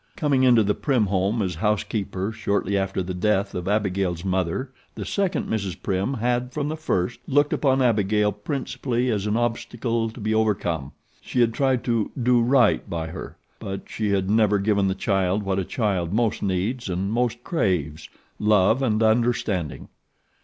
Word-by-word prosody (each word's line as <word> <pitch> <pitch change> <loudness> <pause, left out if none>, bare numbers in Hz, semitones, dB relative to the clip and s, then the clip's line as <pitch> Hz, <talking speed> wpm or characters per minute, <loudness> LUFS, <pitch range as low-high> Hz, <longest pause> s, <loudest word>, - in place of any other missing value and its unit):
Coming 145 -4 +1
into 120 -4 +5
the 105 0 +1
Prim 125 -4 +1
home 100 +3 0
as 90 -2 -2
house 105 +5 0
keeper 100 -1 -3
shortly 100 -2 -1
after 95 -1 -1
the 90 +1 -4
death 100 +2 0
of 90 0 -4
Abigail's 95 -4 0
mother, 95 +8 -1 0.2
the - - -5
second 195 -3 -1
Mrs. 100 -4 -3
Prim 100 +7 -1
had 125 +1 -1
from 145 +1 -2
the 155 - -2
first 120 - -1
looked 145 +1 +2
upon 135 -2 +2
Abigail 105 -3 +2
principally 125 +2 -2
as 105 -1 -1
an 105 +2 +1
obstacle 115 -1 -1
to 110 - -11
be 110 0 -1
overcome. 90 -10 0 0.3
She 125 - -3
had 115 -1 +3
tried 130 -1 +1
to 115 -3 0
'do 125 0 +3
right 120 -4 +3
by 80 -2 -3
her'; - - -8 0.2
but 95 0 -5
she 110 -2 -2
had 95 -2 +1
never 105 0 +3
given 100 0 +1
the 95 - 0
child 95 0 0
what 95 -1 0
a - - 0
child 95 -5 -1
most 110 +1 0
needs 100 +5 -1
and 95 +3 -2
most 120 0 -1
craves 80 - -1 0.3
love 105 +3 +3
and 110 -4 +1
understanding. 110 - 0
105 Hz, 175 wpm, -24 LUFS, 95-120 Hz, 0.3 s, into